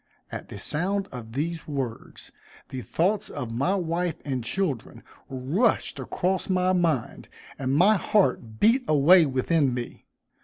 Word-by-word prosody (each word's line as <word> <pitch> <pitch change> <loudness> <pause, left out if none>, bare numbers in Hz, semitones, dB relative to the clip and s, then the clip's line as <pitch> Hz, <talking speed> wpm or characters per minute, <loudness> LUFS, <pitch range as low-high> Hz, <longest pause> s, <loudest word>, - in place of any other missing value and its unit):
At - - -7
the - - -8
sound 195 +5 -1
of 115 -3 -8
these 160 +4 -3
words, 135 -6 -5 0.4
the 130 - -5
thoughts 190 - 0
of 125 -6 -5
my 140 +12 +1
wife 175 -2 -1
and 130 -4 -2
children 140 - -3 0.3
rushed 145 - 0
across 185 +2 -1
my 185 0 +2
mind, 165 -9 -1 0.3
and 135 0 0
my 195 +7 +5
heart 125 - +1
beat 245 +4 +4
away 155 +3 +6
within 135 0 +1
me. 120 -1 -6
160 Hz, 140 wpm, -26 LUFS, 130-185 Hz, 0.4 s, away